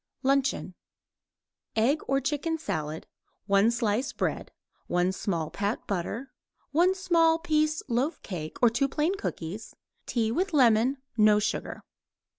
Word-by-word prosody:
LUNCHEON 275 0 +1 1.0
Egg 255 +8 +2
or 270 0 +2
chicken 300 +4 -1
salad; 160 - -4 0.4
1 200 +2 +4
slice 235 +2 0
bread; - - -2 0.4
1 180 +1 +1
small 170 -5 -2
pat 205 +3 -2
butter; 210 +8 -3 0.4
1 355 +5 +3
small 335 -4 +3
piece 310 -2 0
loaf 260 +6 0
cake, 160 -6 -6
or 240 - +8
2 250 +4 +1
plain 300 +6 0
cookies; 200 - -6 0.3
tea 225 -2 0
with 370 +8 -1
lemon, 245 0 +4 0.2
no 210 -1 +6
sugar. 210 - -2
245 Hz, 125 wpm, -28 LUFS, 205-305 Hz, 1.0 s, or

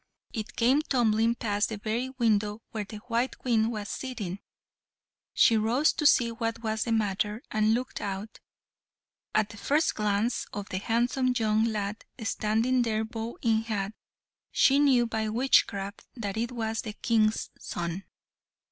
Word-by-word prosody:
It 215 -1 -5
came 255 +5 +4
tumbling 230 -5 +2
past 210 -2 0
the 220 - -4
very 225 +5 -2
window 220 -4 0
where 215 -2 -3
the 215 - -8
white 245 +2 -1
Queen 225 -3 +1
was 210 -3 -4
sitting; 205 -9 -5 0.9
she 230 - +5
rose 240 +8 +3
to 300 - +3
see 240 -4 +4
what 230 0 -3
was 220 -1 -1
the 235 - -2
matter, 210 +1 0
and 215 +1 +3
looked 250 +2 -4
out. 200 +2 -5 1.0
At 215 0 +3
the 205 - -11
first 290 +10 +1
glance 210 +3 0
of 205 -1 -5
the 185 - -2
handsome 245 +4 +1
young 220 -1 +2
lad 210 -2 -2 0.2
standing 225 +4 +1
there 220 -2 0
bow 225 +1 -5
in 225 -1 +3
hand, 210 -3 -3 0.6
she 275 +1 +4
knew 265 -4 +4
by 220 -1 -2
witchcraft 210 -4 +1
that 205 -5 -4
it 230 +2 -1
was 225 -2 -2
the 220 -4 -6
King's 220 -1 +1
son. 170 +2 -4
225 Hz, 155 wpm, -28 LUFS, 210-240 Hz, 1.0 s, she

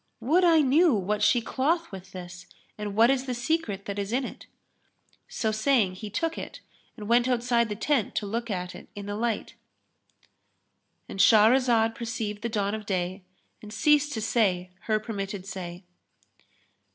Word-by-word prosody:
Would 310 +11 +2
I 330 -3 +6
knew 295 +1 +4
what 210 +1 -1
she 240 - +4
cloth 320 +8 -1
with 190 -1 -10
this 180 -1 -9 0.3
and 210 -1 -5
what 230 +4 +6
is 270 0 -1
the 250 - -2
secret 240 - -2
that 200 0 -4
is 200 +1 -3
in 255 +2 0
it." - - -10 0.8
So 220 - -2
saying, 215 -3 +2
he 205 +3 -7
took 330 +10 -2
it - - -8 0.4
and 210 -2 -7
went 240 +2 +3
outside 240 -2 +1
the 210 - -3
tent 230 +1 0
to 210 - -1
look 230 +3 -3
at 180 -3 -3
it - - -12
in 205 -1 -7
the 205 0 -4
light,—And 220 -3 -9
Shahrazad 225 +1 +5
perceived 225 -3 -4
the 235 - -2
dawn 205 -2 -1
of 215 -1 -5
day, 185 0 -2 0.4
and 210 - -10
ceased 295 +5 +3
to 220 - -3
say 190 -5 +1
her 215 -1 +1
permitted 200 -3 -5
say. 180 -2 -7
220 Hz, 165 wpm, -27 LUFS, 200-250 Hz, 0.8 s, I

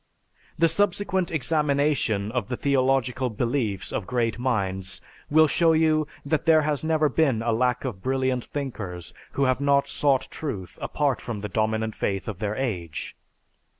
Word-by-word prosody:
The 165 - +5
subsequent 190 +1 +1
examination 140 -8 +1
of 120 -4 -2
the 125 - -3
theological 130 -2 +1
beliefs 115 -3 -2
of 95 - -3
great 115 -2 0
minds 95 -6 -1 0.3
will 155 +1 +6
show 155 -1 +3 0.2
that 155 +3 -1
there 160 -1 +6
has 150 -1 -1
never 155 -1 +2
been 135 -6 +1
a 115 - +1
lack 125 +3 +1
of 105 -8 -4
brilliant 130 0 0
thinkers 105 - -5 0.2
who 140 - +1
have 130 0 +2
not 140 0 +3
sought 140 -3 +1
truth 100 - -6
apart 145 -3 0
from 110 -4 -5
the 105 - -4
dominant 110 +1 0
faith 95 -1 -2
of 110 - -5
their 105 -1 -2
age. 90 - -4
130 Hz, 150 wpm, -25 LUFS, 110-150 Hz, 0.3 s, will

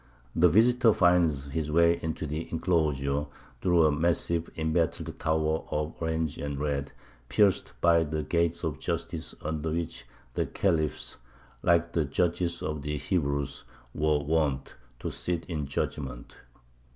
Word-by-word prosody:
The 90 +2 +6
visitor 115 +4 +5
finds 85 -7 +3
his 75 +1 -2
way 85 +1 +4
into 80 0 -3
the 75 +2 -4
enclosure 75 -4 +1 0.3
through 85 -3 +4
a 75 - +4
massive 85 +2 +1
embattled 80 -2 -1
tower 80 0 +1
of 75 +2 -2
orange 80 -2 -1
and 70 -1 -3
red 70 -1 -2 0.4
pierced 100 -3 +3
by 85 -1 +5
the 80 0 -2
Gate 85 +2 0
of 75 -4 -2
Justice - - -3
under 80 +1 -2
which 85 -4 -3 0.3
the - - 0
khalifs, 80 -6 0 0.4
like 85 0 +3
the 80 -3 +2
judges 85 +3 0
of 75 -1 -3
the 75 +1 -2
Hebrews, 70 -3 -1 0.3
were 75 0 +2
wont 75 -2 0 0.3
to - - -3
sit 85 -2 -3
in 75 -5 -3
judgment. 70 -3 -4
80 Hz, 140 wpm, -28 LUFS, 75-85 Hz, 0.4 s, The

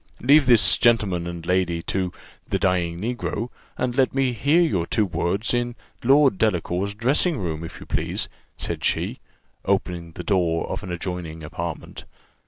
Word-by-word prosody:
Leave 140 +3 +5
this 120 -3 +6
gentleman 105 -8 +2
and 85 -1 -6
lady 90 -2 +1
to 95 -2 -1 0.4
'the - - 0
dying 85 -2 0
Negro,' 115 +1 -3 0.3
and 125 -1 -1
let 130 -1 +2
me 135 -2 +2
hear 140 +9 +3
your 90 - 0
two 110 -2 +2
words 90 +5 -1
in 120 0 -1 0.3
Lord 135 -4 +5
Delacour's 100 -1 0
dressing 140 - +2
room, 80 -5 -3
if 85 - -8
you - - -10
please," - - -1 0.3
said - - -4
she, - - 0 0.4
opening 90 -4 -1
the - - -7
door 85 -5 +1
of - - -3
an 90 - -6
adjoining 85 -2 -4
apartment. 85 +2 -6
95 Hz, 160 wpm, -23 LUFS, 85-120 Hz, 0.4 s, this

